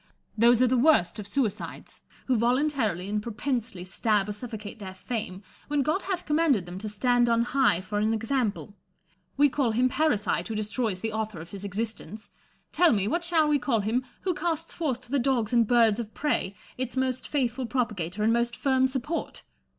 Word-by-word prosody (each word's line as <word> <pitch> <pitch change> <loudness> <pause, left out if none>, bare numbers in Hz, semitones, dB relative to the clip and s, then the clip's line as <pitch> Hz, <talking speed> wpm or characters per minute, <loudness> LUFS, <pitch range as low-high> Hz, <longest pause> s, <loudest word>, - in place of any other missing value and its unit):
Those 235 +2 +5
are - - +5
the 250 0 +2
worst 235 - +3
of 205 - -6
suicides, 220 -1 -3 0.2
who 260 - +2
voluntarily 235 - +1
and 210 +1 -1
propensely 230 -4 -3
stab 210 +1 +1
or 210 - -3
suffocate 220 -1 -7
their 190 -2 -7
fame, 195 -2 -5 0.2
when 290 -1 +1
God 310 +8 0
hath 370 -2 -3
commanded 300 - +2
them 175 +1 -7
to 215 +1 -5
stand 240 +3 +2
on 230 0 +3
high 250 -8 +2
for 205 +3 -3
an 215 +1 +1
example. 225 -2 -1 0.6
"We 290 +1 +6
call 255 -4 0
him 250 +3 +3
parricide 245 - 0
who 225 - -4
destroys 215 -2 -2
the 225 -1 -2
author 220 -4 -3
of 165 +2 -10
his 200 -1 -6
existence: 210 0 -5 0.4
tell 350 -5 +4
me, 200 -2 +1
what 340 +9 0
shall 335 -3 +3
we 295 -1 +3
call 245 -4 +1
him 225 +5 0 0.2
who 370 - 0
casts 330 0 -2
forth 270 -7 -2
to 255 - -15
the 280 - +2
dogs 245 -3 0
and 235 -2 +4
birds 230 -2 +4
of 225 -2 -6
prey 285 -9 -1 0.2
its 255 0 -3
most 260 -1 -1
faithful 255 -3 -1
propagator 210 -6 -2
and 225 +1 +3
most 235 0 0
firm 260 -1 +2
support 270 +5 -4
235 Hz, 190 wpm, -27 LUFS, 210-265 Hz, 0.6 s, We